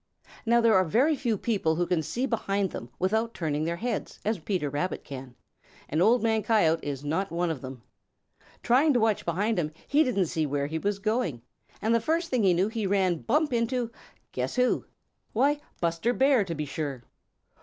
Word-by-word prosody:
Now 235 Hz, +1 st, +5 dB
there 230 Hz, -1 st, +4 dB
are 185 Hz, -, +5 dB
very 255 Hz, -, +2 dB
few 240 Hz, -6 st, -1 dB
people 195 Hz, -8 st, 0 dB
who 175 Hz, +2 st, +1 dB
can 175 Hz, -2 st, +1 dB
see 240 Hz, -, -2 dB
behind 200 Hz, -5 st, -1 dB
them 120 Hz, -, -7 dB
without 220 Hz, +5 st, 0 dB
turning 155 Hz, -2 st, -1 dB
their 170 Hz, +1 st, -1 dB
heads 235 Hz, +7 st, -4 dB
as 215 Hz, -2 st, 0 dB
Peter 175 Hz, -2 st, -2 dB
Rabbit 145 Hz, +6 st, -2 dB
can, 130 Hz, -3 st, -9 dB, 0.5 s
and 155 Hz, +4 st, 0 dB
Old 235 Hz, +6 st, +4 dB
Man 220 Hz, -1 st, +2 dB
Coyote 170 Hz, -8 st, +2 dB
is 145 Hz, -1 st, -4 dB
not 185 Hz, +7 st, -1 dB
one 170 Hz, 0 st, 0 dB
of 145 Hz, -6 st, -5 dB
them. 130 Hz, -3 st, -8 dB, 0.8 s
Trying 275 Hz, +5 st, +4 dB
to 245 Hz, -, +3 dB
watch 220 Hz, -2 st, +1 dB
behind 195 Hz, +5 st, 0 dB
him, 155 Hz, -2 st, -1 dB, 0.2 s
he 295 Hz, +2 st, +4 dB
didn't 210 Hz, -9 st, +1 dB
see 160 Hz, -1 st, -1 dB
where 140 Hz, 0 st, -1 dB
he 160 Hz, +3 st, -3 dB
was 200 Hz, +3 st, -1 dB
going, 200 Hz, -, -1 dB, 0.4 s
and 220 Hz, +2 st, +2 dB
the 230 Hz, -, +3 dB
first 330 Hz, +7 st, -1 dB
thing 250 Hz, -3 st, +2 dB
he 185 Hz, -4 st, +4 dB
knew 185 Hz, +3 st, +2 dB
he 220 Hz, -2 st, -2 dB
ran 190 Hz, -3 st, +2 dB
bump 295 Hz, +2 st, +1 dB
into 235 Hz, 0 st, 0 dB, 0.4 s
guess -, -, -3 dB
who! 250 Hz, -1 st, +2 dB, 0.5 s
Why, 285 Hz, +6 st, +2 dB, 0.2 s
Buster 170 Hz, +8 st, 0 dB
Bear, 265 Hz, -4 st, +3 dB
to 170 Hz, -3 st, -4 dB
be 150 Hz, 0 st, -3 dB
sure. 140 Hz, -3 st, -4 dB
200 Hz, 195 wpm, -27 LUFS, 160-235 Hz, 0.8 s, Now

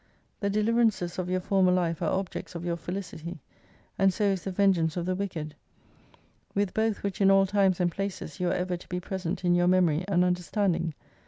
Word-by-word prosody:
The 200 Hz, -, 0 dB
deliverances 215 Hz, -4 st, +1 dB
of 180 Hz, -1 st, -2 dB
your 185 Hz, 0 st, 0 dB
former 190 Hz, -1 st, +3 dB
life 175 Hz, -2 st, 0 dB
are 165 Hz, -, +1 dB
objects 190 Hz, -1 st, -3 dB
of 170 Hz, +1 st, -5 dB
your 170 Hz, -1 st, 0 dB
felicity, 175 Hz, -1 st, -6 dB, 0.6 s
and 195 Hz, 0 st, +5 dB
so 210 Hz, -, -2 dB
is 195 Hz, -3 st, +1 dB
the 195 Hz, -, -2 dB
vengeance 180 Hz, -4 st, +2 dB
of 175 Hz, -, -1 dB
the 185 Hz, -, 0 dB
wicked. 175 Hz, -6 st, -4 dB, 1.0 s
\)0^ith 200 Hz, -2 st, 0 dB
both 220 Hz, -1 st, 0 dB
which 200 Hz, 0 st, -3 dB
in 195 Hz, -, +6 dB
all 195 Hz, 0 st, +6 dB
times 195 Hz, -2 st, +2 dB
and 175 Hz, -1 st, +2 dB
places 195 Hz, -4 st, -5 dB
you 180 Hz, -, 0 dB
are -, -, +1 dB
ever 180 Hz, 0 st, -1 dB
to 175 Hz, -, -16 dB
be 180 Hz, -, -2 dB
present 185 Hz, 0 st, -4 dB
in 175 Hz, -, +4 dB
your 175 Hz, 0 st, +3 dB
memory 180 Hz, -3 st, +3 dB
and 180 Hz, -2 st, +3 dB
under 180 Hz, 0 st, +1 dB
standing. 175 Hz, -4 st, 0 dB
185 Hz, 210 wpm, -28 LUFS, 175-195 Hz, 1.0 s, in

